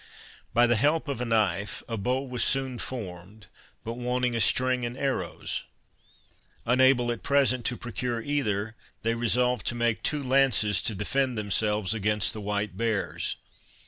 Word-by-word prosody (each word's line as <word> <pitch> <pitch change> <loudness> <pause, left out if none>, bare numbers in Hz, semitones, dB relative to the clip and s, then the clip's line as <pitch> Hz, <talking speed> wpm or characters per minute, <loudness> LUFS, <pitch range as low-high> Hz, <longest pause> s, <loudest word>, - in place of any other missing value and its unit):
By 120 +1 +5
the 120 -1 +3
help 150 +7 +2
of 140 -4 -3
a - - -1
knife, 105 -4 0
a 115 - -3
bow 125 +5 -1
was 125 -3 -1
soon 130 -3 0
formed 100 -3 -7 0.4
but 115 +2 -5
wanting 125 0 0
a 115 - +1
string 130 +1 +2
and 120 +1 -4
arrows. 135 -1 -2 1.0
Unable 125 0 +4
at 120 - -5
present 135 -4 +2
to 120 - +1
procure 120 0 -3
either, 110 -5 -1 0.3
they 115 +1 +1
resolved 125 +2 +1
to 120 - 0
make 120 -2 0
two 150 -2 -1
lances 125 -7 +3
to 110 - -1
defend 125 +5 0
themselves 105 0 +1
against 105 -1 +1
the 110 - -6
white 105 -2 -2
bears. 110 -1 -1
120 Hz, 155 wpm, -27 LUFS, 105-130 Hz, 1.0 s, By